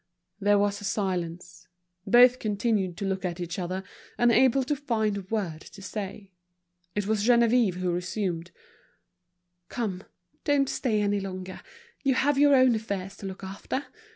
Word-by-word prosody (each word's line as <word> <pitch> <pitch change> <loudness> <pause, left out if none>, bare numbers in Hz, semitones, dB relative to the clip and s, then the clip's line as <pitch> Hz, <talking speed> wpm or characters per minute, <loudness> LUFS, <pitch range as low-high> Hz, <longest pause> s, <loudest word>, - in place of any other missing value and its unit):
There 205 0 +4
was 205 0 0
a - - -9
silence. 180 -3 -3 0.4
Both 250 +1 +7
continued 205 -4 0
to 200 - -3
look 190 0 -2
at 175 -1 -3
each 175 +1 -4
other, 185 +1 -3 0.3
unable 250 +2 +4
to 290 +3 -1
find 225 -7 -1
a 200 - -3
word 190 -5 -3
to 195 - -13
say. 200 -1 -6 0.6
It 205 -1 0
was 215 0 0
Geneviève 235 -3 +4
who 180 -1 -1
resumed: 180 -1 -2 1.2
"Come, 205 -7 -3 0.4
don't 285 -2 +2
stay 220 -5 0
any 205 0 +1
longer, 185 -1 -6 0.4
you 270 -2 +2
have 275 +1 +2
your 285 -1 +6
own 255 -2 +5
affairs 200 -3 -4
to 195 - -6
look 190 0 -8
after. 195 +8 -4
205 Hz, 155 wpm, -27 LUFS, 185-235 Hz, 1.2 s, Both